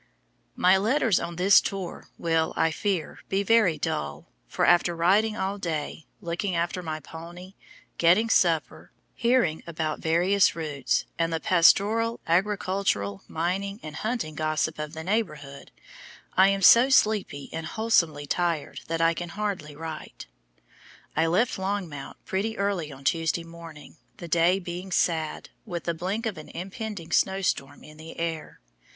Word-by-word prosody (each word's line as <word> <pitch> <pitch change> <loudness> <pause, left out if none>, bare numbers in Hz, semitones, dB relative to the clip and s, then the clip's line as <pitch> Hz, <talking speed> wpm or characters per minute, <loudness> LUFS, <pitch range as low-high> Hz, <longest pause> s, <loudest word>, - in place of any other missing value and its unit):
My 185 +2 +5
letters 225 0 +2
on 170 0 -5
this 190 +3 +6
tour 190 -3 -5
will, 165 -1 0
I 165 - +2
fear, 180 -1 -2
be 195 +1 +1
very 210 -6 +4
dull, 70 -1 -3 0.2
for - - 0
after 175 0 +4
riding 205 +6 +2
all 195 +2 -2
day, 160 -3 -4
looking 175 +1 -2
after 170 +2 -1
my 155 -2 -4
pony, 170 +5 -10 0.5
getting 180 +7 +4
supper, 170 -7 +1 0.2
hearing 235 -10 +1
about 160 -2 -3
various 180 +5 +3
routes, 150 -4 -1
and 165 0 +1
the 165 - -1
pastoral, 210 +7 +3
agricultural, 185 - 0
mining, 195 +5 -2
and 155 -1 -7
hunting 220 -8 -2
gossip 155 +1 -1
of 150 0 -5
the 160 0 -6
neighborhood, 155 -9 -3 0.7
I 190 +1 +6
am 195 0 0
so 240 +7 +8
sleepy 210 - +2
and 165 0 -4
wholesomely 165 -9 +1
tired 170 0 -2
that 165 0 -2
I 165 0 +4
can 175 +1 -5
hardly 190 -7 -4
write. 160 +1 -8 0.9
I 160 +1 +2
left 195 +6 +1
Longmount 190 -7 -4
pretty 220 +4 -2
early 195 -6 -1
on 135 0 -12
Tuesday 165 +2 0
morning, 165 -2 -12 0.2
the 170 - -8
day 170 +3 +3
being 180 0 -6
sad, 160 -3 0
with 175 -6 -5
the 170 - -1
blink 190 +8 -3
of 205 -8 -3
an 155 - -11
impending 190 -1 -6
snow 190 +2 +2
storm 135 -5 -2
in 155 0 -14
the 160 +1 -10
air. 165 -2 -4
170 Hz, 150 wpm, -26 LUFS, 160-195 Hz, 0.9 s, so